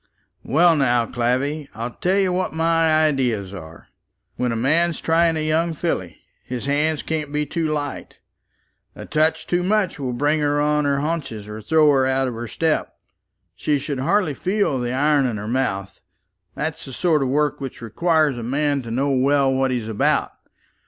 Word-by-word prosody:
"Well, 165 +5 +4
now, 120 -5 +2
Clavvy, 130 +6 -1
I'll 115 +2 -4
tell 185 +9 0
you 190 -2 +2
what 185 -3 -2
my 160 -1 +3
ideas 120 -10 0
are. 80 -3 -11 0.5
When 125 -1 -1
a - - -2
man's 155 +8 +1
trying 165 0 +2
a 155 - -2
young 165 +1 +1
filly, 120 - -3 0.3
his 125 0 -5
hands 150 +2 0
can't 155 -2 -3
be 150 0 -1
too 165 +1 -2
light. 145 -2 -4 0.8
A - - -8
touch 155 +1 +1
too 175 0 0
much 195 -2 0
will 130 -3 -3
bring 145 +5 +1
her 145 0 +1
on 150 0 +1
her 140 -1 +1
haunches, 145 -10 -3
or 105 +1 -7
throw 155 +6 +4
her 135 -2 +3
out 130 0 +1
of 125 - -3
her 115 +1 -6
step. 160 +6 -1 0.6
She 150 -1 0
should 140 -1 -4
hardly 170 +3 +1
feel 185 -4 0
the 120 0 -2
iron 145 +1 +2
in 115 -3 -3
her 105 +1 -6
mouth. 100 -6 -2 0.6
That's 160 0 -4
the 135 - -9
sort 160 0 +1
of 135 - 0
work 145 +1 0
which 135 -2 -6
requires 155 - +1
a - - -5
man 140 +4 0
to 115 - -9
know 135 +5 0
well 135 +1 +2
what 135 0 +1
he's 120 -4 -2
about. 110 -2 +1
145 Hz, 185 wpm, -22 LUFS, 125-160 Hz, 0.8 s, Well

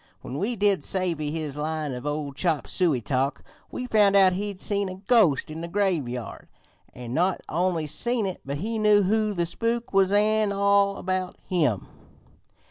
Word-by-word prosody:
When 135 - -6
we 230 +6 -1
did 200 -6 +1
savvy 170 -5 -1
his 155 -2 -4
line 155 -1 -3
of 145 +2 -4
chop 160 -3 0
suey 160 -9 +1
talk, 135 +4 -1 0.3
we 250 - -5
found 210 -4 +3
out 190 -2 +6
he'd 200 0 -4
seen 200 -1 -1
a 185 - -6
ghost 190 - +2
in 160 +1 -6
the 170 - -4
graveyard, 165 - -2 0.5
an' 120 -1 -7
not 180 +5 +1
only 170 -1 0
seen 235 - -1
it 190 -2 -5
but 140 +1 -4
he 220 +7 -3
knew 210 -1 +4
who 215 +1 +1
the 170 -1 0
spook 230 +6 -2
was 195 -1 +3
an' 210 0 +3
all 200 0 +2
about 185 0 -2
him. 150 - 0
185 Hz, 170 wpm, -25 LUFS, 150-205 Hz, 0.5 s, out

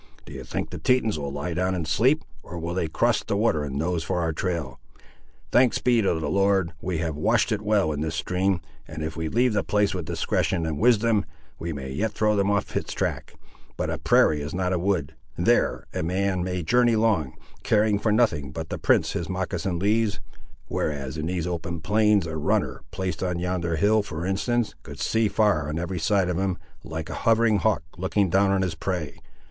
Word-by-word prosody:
Do - - -10
you - - -7
think - - -4
the - - -6
Tetons 115 -9 +2
will 70 -1 -4
lie 70 +5 -3
down 90 +2 0
and 85 -3 -3
sleep; 125 - +3 0.2
or 90 - -9
will 85 +1 -3
they 90 -2 -1
cross - - +1
the 100 - -1
water 100 -9 +2
and 70 -2 -5
nose 85 +3 -1
for 85 - -1
our 80 -1 0
trail? 85 -7 -3 0.7
Thanks 125 -1 +4
be 120 -2 +3
to 95 - +1
the 80 - -3
Lord, 95 -1 +2
we 90 -2 -2
have 80 -1 -2
washed 110 +10 +2
it 105 -1 0
well 105 -6 +2
in 75 -1 -3
this 80 +1 -2
stream, 90 +1 0 0.3
and 80 0 -6
if 80 0 -4
we 80 0 -3
leave 120 +4 +2
the 100 - +1
place 105 -1 +1
with 90 -4 -4
discretion 85 -3 0
and 80 -2 -3
wisdom, 115 -2 +3 0.4
we 85 - -3
may 65 -3 -5
yet 105 +10 -1
throw 105 0 +2
them 100 0 +2
off 100 -1 -1
its - - -2
track. - - -3 0.4
But - - -1
a - - -3
prairie 75 -1 +3
is 75 +4 -5
not 90 0 0
a 90 - 0
wood. 90 -6 0 0.2
There - - +2
a - - -2
man 95 +2 0
may 90 -1 -2
journey 120 +5 +3
long, 110 - +1 0.3
caring 105 -1 +2
for 110 - +1
nothing 85 - +1
but 80 +2 -6
the - - -4
prints - - +3
his 85 - -3
moccasin 95 -1 -2
leaves, 105 +3 +1 0.5
whereas 70 -2 -2
in 80 0 -3
these 90 -2 -2
open 85 -1 -3
plains 105 +2 +3
a 80 -1 -4
runner, 75 - 0
placed 95 0 -4
on 90 -2 -1
yonder 85 -1 -1
hill, 105 +5 +3
for 85 -4 -5
instance, 115 +5 0
could - - -10
see 110 -1 +2
far 100 -9 +2
on 75 - -3
every 85 +1 -3
side 95 +3 +2
of 90 0 -1
him, 95 -2 0 0.3
like 80 -1 -5
a - - -5
hovering 115 -1 +4
hawk 110 -7 +1 0.2
looking 95 0 +1
down 100 +1 +4
on 95 -1 +2
his 90 -3 -1
prey. 80 -3 -4
90 Hz, 210 wpm, -25 LUFS, 80-105 Hz, 0.7 s, Thanks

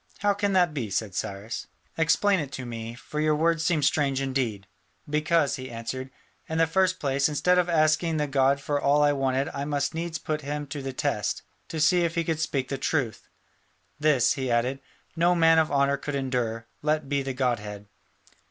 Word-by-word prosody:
"How 205 0 +2
can 200 0 0
that 180 -4 +3
be?" 125 -8 -3
said 100 0 -2
Cyrus. 100 +5 -4 0.3
"Explain 185 +5 +3
it 145 -3 -4
to 130 0 -5
me: 115 -1 -6
for 150 +5 -6
your 155 0 +3
words 165 +1 +1
seem 165 -5 +1
strange 140 -1 +2
indeed." 130 -7 -2 0.4
"Because," 150 0 +1
he 130 0 -7
answered, 120 +3 -5 0.4
"in 160 - -2
the 165 - +5
first 185 +2 +1
place, 140 0 +1
instead 180 +5 +3
of 180 0 +1
asking 160 0 +2
the 150 - +1
god 135 0 +2
for 145 +1 -1
all 145 +1 +4
I 145 - +5
wanted 135 -1 0
I 140 - -4
must 145 -1 -1
needs 165 0 -3
put 155 -2 -3
him 145 +1 -4
to 145 0 -5
the 135 0 -4
test, 130 - -2 0.2
to 160 - -5
see 170 +4 +4
if 165 0 -1
he 170 - +1
could 160 -1 -1
speak 135 -5 -1
the 135 - -3
truth. 130 -7 -2 0.7
This," 145 -5 +3
he 130 -2 -3
added, 120 +3 +1 0.4
"no 175 +1 +3
man 165 -1 +5
of 160 - +1
honour 140 0 +2
could 145 +1 -4
endure, 125 -4 -2 0.2
let 150 -1 0
be 140 0 0
the 135 -1 -4
godhead. 105 -6 -2
145 Hz, 200 wpm, -26 LUFS, 130-160 Hz, 0.7 s, the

